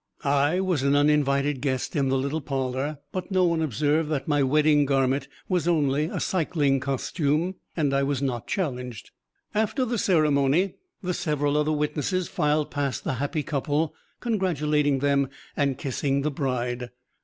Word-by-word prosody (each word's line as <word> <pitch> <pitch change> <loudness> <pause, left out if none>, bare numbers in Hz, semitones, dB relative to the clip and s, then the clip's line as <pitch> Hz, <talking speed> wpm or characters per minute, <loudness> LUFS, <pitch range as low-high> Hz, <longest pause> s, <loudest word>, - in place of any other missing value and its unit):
I 145 +5 +2
was 180 -7 0
an 140 +1 +3
uninvited 145 -2 +2
guest 130 -3 -2
in 140 -3 +2
the 135 - +2
little 140 +4 -1
parlor, 135 +1 -2
but 185 -1 -4
no 185 -2 +3
one 170 -2 +1
observed 150 +2 +1
that 150 0 -2
my 145 -2 +2
wedding 150 +2 +4
garment 135 0 +1 0.2
was 180 -3 0
only 150 -3 +2
a 160 - -3
cycling 150 -6 +1
costume, 145 +5 0 0.2
and 145 -4 +1
I 135 - +3
was 140 -1 0
not 125 -4 -2
challenged. 125 - -3 0.4
After 220 +5 +1
the 235 -2 -1
ceremony, 155 0 +3 0.3
the 180 0 -1
several 145 -3 0
other 150 +1 +2
witnesses 150 +4 -1
filed 150 0 0
past 140 -2 -2
the - - -1
happy 150 +1 -1
couple, 150 +1 -1 0.3
congratulating 150 - +1
them 140 -1 +2 0.3
and 140 -2 +1
kissing 140 0 -1
the 150 - 0
bride. 125 -3 -2
145 Hz, 155 wpm, -26 LUFS, 135-155 Hz, 0.4 s, wedding